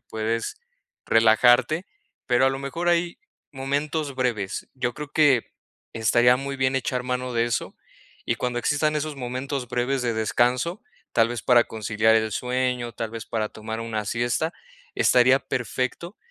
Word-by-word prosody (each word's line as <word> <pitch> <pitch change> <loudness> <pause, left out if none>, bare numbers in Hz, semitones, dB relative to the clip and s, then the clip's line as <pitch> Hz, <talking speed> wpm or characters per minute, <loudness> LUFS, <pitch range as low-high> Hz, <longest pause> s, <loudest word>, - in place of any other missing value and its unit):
puedes 115 - -3 0.5
relajarte, 120 - +4 0.4
pero 125 +1 +3
a 135 - +4
lo 135 - -3
mejor 165 +6 -3
hay 170 0 +1 0.3
momentos 145 +2 -2
breves, 115 -7 -2
yo 125 -2 -2
creo 150 -1 -7
que, 145 -6 +3 0.4
estaría 120 +2 +4
muy 135 +1 -5
bien 130 0 +1
echar 125 0 -1
mano 125 0 -3
de 115 0 +1
eso, 120 - -2 0.5
y - - +1
cuando 125 -1 -2
existan 150 +4 +1
esos 150 -1 -3
momentos 130 0 -4
breves 125 +2 -1
de 120 -2 0
descanso, 125 - 0 0.3
tal 115 -1 +3
vez 120 -1 -4
para 120 -1 +5
conciliar 110 0 +1
el 110 -1 +2
sueño, 125 0 -1
tal 110 0 -4
vez 115 -2 -7
para 110 -2 -2
tomar 110 +1 -6
una 110 -2 -3
siesta, 120 +9 -1 0.4
estaría 130 +1 +5
perfecto 130 - -3
125 Hz, 150 wpm, -24 LUFS, 115-135 Hz, 0.5 s, para